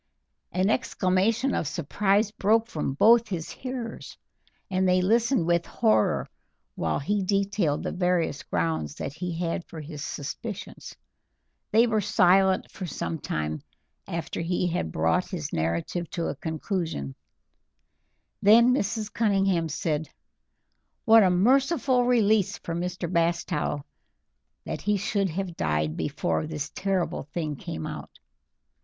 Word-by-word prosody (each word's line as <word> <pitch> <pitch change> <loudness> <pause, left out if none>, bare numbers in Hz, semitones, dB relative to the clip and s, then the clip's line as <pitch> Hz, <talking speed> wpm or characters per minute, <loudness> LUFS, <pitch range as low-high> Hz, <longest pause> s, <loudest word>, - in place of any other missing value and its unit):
An 185 +4 +2
exclamation 220 +3 +1
of 160 - -1
surprise 195 +7 +1
broke 220 +2 +2
from 150 - -3
both 230 +7 +5
his 170 -6 -4
hearers, 250 -3 -6 0.5
and 185 -1 +1
they 180 0 +4
listened 225 +1 +2
with 170 0 +1
horror 110 0 +2 0.5
while 80 -2 -1
he 205 +8 0
detailed 195 -5 0
the - - -2
various 180 -4 0
grounds 80 -3 -2
that 135 - -5
he 170 +1 -4
had 170 0 -2
for 160 - -9
his 150 -1 -7
suspicions. 180 +10 -6 0.8
They 225 +3 +5
were 220 -2 +1
silent 190 -2 +3
for 185 - -6
some 165 0 -4
time 75 - -3 0.5
after 165 -1 -4
he 175 +2 0
had 165 - -2
brought 80 - +1
his 160 -6 -5
narrative 85 - -2
to 170 - 0
a - - -4
conclusion, 160 - -3 1.3
then 235 +4 +6
Mrs. 220 -3 -2
Cunningham 195 -6 +2
said: 155 +1 -2 1.0
"What 225 -1 +8
a 190 - +5
merciful 255 - +3
release 215 -6 +3
for 165 - -6
Mr. 180 +1 -3
Bastow 170 -4 0 0.8
that - - -4
he 210 0 +1
should 200 0 0
have 180 +1 -4
died 75 - 0
before 155 - -1
this 150 -2 -4
terrible 190 -3 -1
thing 155 -4 -2
came 80 - -6
out! - - -8
180 Hz, 130 wpm, -26 LUFS, 155-210 Hz, 1.3 s, What